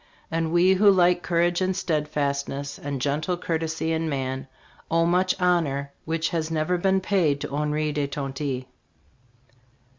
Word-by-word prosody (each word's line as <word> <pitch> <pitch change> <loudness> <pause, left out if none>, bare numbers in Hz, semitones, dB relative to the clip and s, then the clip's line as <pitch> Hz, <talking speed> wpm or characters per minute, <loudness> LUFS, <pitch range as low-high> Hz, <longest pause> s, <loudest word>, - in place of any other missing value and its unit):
And 165 0 -1
we 175 +2 +5
who 200 +2 +5
like 180 -2 +4
courage 175 +1 +1
and 185 0 +1
steadfastness 145 -4 -2
and 140 -1 -4
gentle 150 +6 -1
courtesy 160 -1 -2
in 160 0 -1
man 130 -1 -3 0.4
owe 165 0 +3
much 180 +2 +2
honor 145 -6 +1
which 160 0 -1
has 165 -3 -2
never 165 +3 0
been 190 +1 +2
paid 175 -8 +1
to - - -5
Henri 150 +1 0
de 145 -1 -1
Tonty." 135 -2 -4
160 Hz, 145 wpm, -25 LUFS, 145-175 Hz, 0.4 s, we